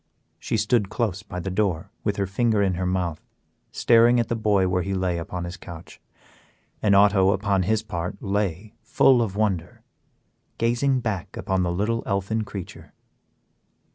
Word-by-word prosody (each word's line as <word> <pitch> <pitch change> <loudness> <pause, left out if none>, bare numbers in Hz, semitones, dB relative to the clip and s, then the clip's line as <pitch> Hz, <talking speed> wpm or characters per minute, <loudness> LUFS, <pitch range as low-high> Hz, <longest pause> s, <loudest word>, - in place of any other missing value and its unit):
She - - -2
stood 105 -1 +1
close 105 -3 -2
by 95 -3 -7
the 95 +2 -4
door 100 -1 -1
with 105 - 0
her 100 - -1
finger 105 +2 +1
in 95 -2 +1
her 90 +1 -2
mouth, 90 -4 -2 0.5
staring 120 +1 +4
at 115 - -1
the 115 - 0
boy 105 -4 +2
where 90 0 +1
he 95 +2 -2
lay 90 -2 -1
upon 85 +1 -5
his 85 +2 -6
couch, 85 -2 -11 0.8
and 100 -2 +3
Otto 100 -1 +5
upon 100 -1 0
his 110 +4 0
part 90 -4 -5
lay, 100 0 -2
full 120 +2 +4
of 105 -4 -2
wonder, 100 -6 -2 0.7
gazing 125 +3 +1
back 110 -7 -4
upon 95 -1 -1
the 90 -1 0
little 105 +6 -1
elfin 100 +2 -1
creature. 100 -4 -9
100 Hz, 165 wpm, -24 LUFS, 90-110 Hz, 0.8 s, Otto